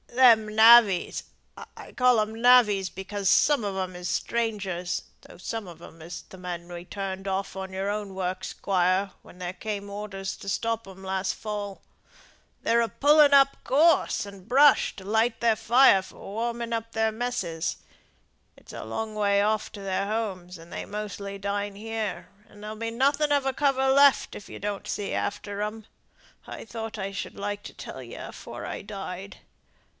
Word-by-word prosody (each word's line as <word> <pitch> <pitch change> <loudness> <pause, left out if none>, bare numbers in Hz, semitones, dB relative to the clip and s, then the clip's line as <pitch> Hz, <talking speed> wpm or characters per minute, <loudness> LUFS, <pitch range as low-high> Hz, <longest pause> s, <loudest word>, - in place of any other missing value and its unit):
"Them 230 -4 +5
navvies 220 -4 +6 0.5
I - - -10
call 250 -2 +4
'em 220 +1 -2
navvies 220 -6 +5
because 195 +1 -3
some 290 -6 +4
on 200 -2 -3
'em 185 -1 -3
is 180 0 -5
strangers, 195 -5 -2 0.2
though - - -15
some 210 +3 -5
on 170 -2 -12
'em 165 -1 -13
is 170 +2 -8
th' 190 - -14
men 180 -2 -5
as 175 - -18
was 175 0 -8
turned 195 -1 -5
off 195 0 -2
your 190 +1 -4
own 205 -2 -4
works, 185 0 -3
squire, 185 +1 +1
when - - -16
there 180 0 -5
came 200 +1 -5
orders 200 -2 -5
to 195 - -7
stop 230 +1 -1
'em 190 0 -12
last 190 0 -1
fall 205 -2 -5 0.8
they're 235 +1 +3
a 230 - 0
pulling 295 0 +5
up 275 0 +6
gorse 315 -4 +3
and 200 -1 -12
brush 275 +3 +5
to 190 - -10
light 225 +4 +1
their 230 -2 +3
fire 240 -3 +5
for - - -14
warming 235 +2 -4
up 230 0 -3
their 220 0 +1
messes. 220 -9 -3 0.8
It's - - -14
a - - -6
long 215 - -4
way 200 -1 +2
off 215 +1 0
to 205 - -8
their 195 0 -1
homes, 190 -5 -3
and 165 +1 -13
they - - -5
mostly 200 -1 -6
dine 200 0 -3
here; 220 0 -4 0.2
and 210 - -15
there'll 215 +1 -6
be 230 +1 -4
nothing 280 +5 +2
of 285 -2 +2
a 270 - 0
cover 270 -1 +2
left, 280 0 +5
if 205 - -10
you - - -8
don't 205 -1 -4
see 200 -1 -3
after 205 0 -3
'em. 210 +1 -4 0.6
I - - -8
thought 225 -1 -6
I 195 -1 -3
should 195 - -6
like 205 0 -4
to - - -9
tell - - -8
ye - - -10
afore - - -8
I - - -5
died. 195 -1 -7
205 Hz, 180 wpm, -26 LUFS, 190-230 Hz, 0.8 s, navvies